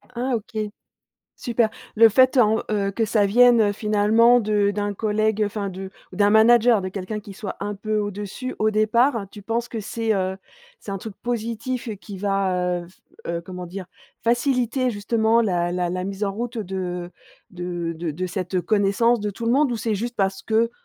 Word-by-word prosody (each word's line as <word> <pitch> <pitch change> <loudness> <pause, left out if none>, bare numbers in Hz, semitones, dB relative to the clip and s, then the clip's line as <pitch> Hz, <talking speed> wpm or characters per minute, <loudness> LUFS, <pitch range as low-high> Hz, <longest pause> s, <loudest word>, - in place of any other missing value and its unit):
Ah 250 +1 0
OK, 220 0 -6 0.8
super. 235 -2 +1 0.3
Le 225 0 +8
fait 260 +5 +4
en, 220 -2 +4
heu, 200 -2 0
que 225 +3 0
ça 210 -1 +2
vienne, 240 +3 +6
heu, 205 -2 +3
finalement 215 +3 +4
de 210 -1 +1
d'un 205 0 -2
collègue, 215 +1 0
heu, 210 - +3
enfin 205 -1 -3
de 190 +1 -7 0.2
ou - - -9
d'un 205 0 +4
manager, 230 0 +5
de 185 - -3
quelqu'un 195 +3 -5
qui 200 -1 -11
soit 195 +1 -6
un 205 +1 -3
peu 215 +2 -2
au-dessus 205 +5 -4
au 215 - +2
départ, 220 +1 +2
tu 205 - -11
penses 230 +3 -2
que 225 - -5
c'est, 225 +1 -1
heu, 190 -1 -1 0.4
c'est 200 - -9
un 195 - -3
truc 215 +1 -8
positif 235 +1 -3
et 215 - -4
qui 200 0 -10
va, 185 -3 0
heu, - - -12
f 185 - -23 0.3
heu, 170 0 -2
comment 180 +1 -7
dire 185 +1 -7 0.4
faciliter 250 +1 +1
justement 220 +2 +2
la 175 -4 0
la 180 -1 -1
la 180 0 -3
mise 195 +2 -3
en 195 - -1
route 235 +3 -4
de 180 -3 -4 0.4
de 175 -2 -4
de 165 0 -4
de 185 +5 -3
cette, 185 0 -4
heu, 180 - +1
connaissance 215 +3 +2
de 210 0 -2
tout 230 +4 -6
le 235 - +3
monde 280 0 +3
ou - - -1
c'est 220 -1 -1
juste 235 +4 -4
parce 195 -1 0
que, 225 +1 +1
210 Hz, 205 wpm, -23 LUFS, 195-230 Hz, 0.8 s, Le